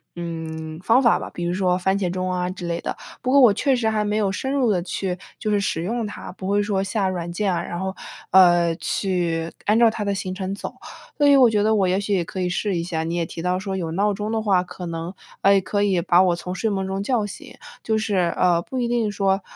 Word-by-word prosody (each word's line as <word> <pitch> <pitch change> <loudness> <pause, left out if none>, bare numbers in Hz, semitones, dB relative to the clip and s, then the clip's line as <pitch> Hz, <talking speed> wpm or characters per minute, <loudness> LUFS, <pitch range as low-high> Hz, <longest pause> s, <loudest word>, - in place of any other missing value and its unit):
嗯， 160 -2 -6
方 230 +6 +4
法 235 - +4
吧， - - -6
比 175 - -5
如 175 +1 -1
说 180 -1 +1
番 190 +2 +1
茄 185 -3 0
钟 185 +1 -2
啊 180 0 -1
之 180 -1 -6
类 170 0 -2
的。 - - -3 0.3
不 255 +1 -1
过 280 - +6
我 230 -5 +7
确 270 +5 +2
实 230 -3 +1
还 215 -1 0
没 210 0 -1
有 205 -2 +1
深 265 +7 -3
入 255 -6 +2
地 180 -3 +1
去 185 0 -3 0.2
就 215 - -2
是 205 - +2
使 165 -4 -1
用 230 +5 -2
它， 205 - -8
不 185 0 -7
会 205 +1 +2
说 200 -2 0
下 195 0 -1
软 175 -2 -4
件 195 +1 0
啊， 170 - -1
然 175 - -5
后， 190 0 -3 0.4
呃， 175 -2 +5
去 170 -4 -1 0.2
按 210 +2 +3
照 235 -1 +6
它 220 -1 -4
的 200 - 0
行 185 -1 -4
程 190 0 -3
走。 - - -6 0.4
所 295 - +3
以 285 - +7
我 255 -3 +7
觉 210 - +2
得 220 +1 +3
我 195 -3 +2
也 185 +1 +2
许 205 0 -1
也 175 - 0
可 185 - -5
以 180 - 0
试 195 +2 -1
一 170 - -1
下。 165 -2 -2
你 165 - -3
也 170 - 0
提 165 - -7
到 180 0 +1
说 190 -1 -4
有 165 -3 -3
闹 200 +5 +1
钟 210 +2 -4
的 220 - 0
话 195 -4 +2
可 180 0 -8
能 165 +2 -5 0.3
呃， 195 0 +5
可 205 +2 -1
以 190 -4 +2
把 175 0 +4
我 180 -2 +2
从 180 +1 -6
睡 220 +4 -1
梦 195 -2 -1
中 195 +1 -3
叫 225 -1 0
醒， 205 - -10 0.3
就 220 -1 +1
是， 215 -2 -1 0.2
呃， 175 -2 +3
不 260 - -5
一 240 -1 0
定 235 -3 +1
说， 195 -1 +1
190 Hz, 285 characters per minute, -22 LUFS, 175-210 Hz, 0.4 s, 我